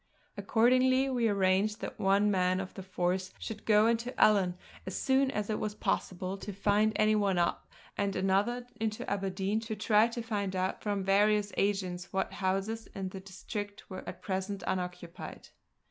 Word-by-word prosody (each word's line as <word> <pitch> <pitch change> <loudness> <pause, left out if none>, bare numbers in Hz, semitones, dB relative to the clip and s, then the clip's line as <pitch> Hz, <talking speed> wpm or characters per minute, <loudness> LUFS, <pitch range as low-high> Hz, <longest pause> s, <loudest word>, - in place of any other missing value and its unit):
Accordingly 255 +3 +3
we 240 -3 +2
arranged 200 +1 +2
that - - -6
one 200 +1 +3
man 185 -1 +2
of 190 -1 -5
the - - -7
force 185 0 -1
should 220 -1 -7
go 210 0 +6
into 235 +2 0
Ellon, 195 -4 +4 0.3
as 190 - -3
soon 265 0 +3
as 210 -6 -2
it 215 - -1
was 210 -1 -3
possible 185 -2 -2
to 205 - -6
find 205 +2 +2
any 215 0 +3
one 200 -3 +2
up, 170 0 0 0.3
and 200 -1 0
another 200 +6 +1
into 215 -1 -2
Aberdeen 195 +1 -1
to 225 -1 -5
try 215 +1 +4
to 235 0 -5
find 200 -4 -2
out 185 0 -1
from 205 -2 -1
various 205 +1 +3
agents 190 -3 -1
what 190 0 -1
houses 195 +4 -2
in 190 -2 -3
the 190 - -7
district 200 +2 -7
were 185 - -6
at - - -10
present 190 0 -3
unoccupied. 180 -1 -5
200 Hz, 170 wpm, -31 LUFS, 190-215 Hz, 0.3 s, go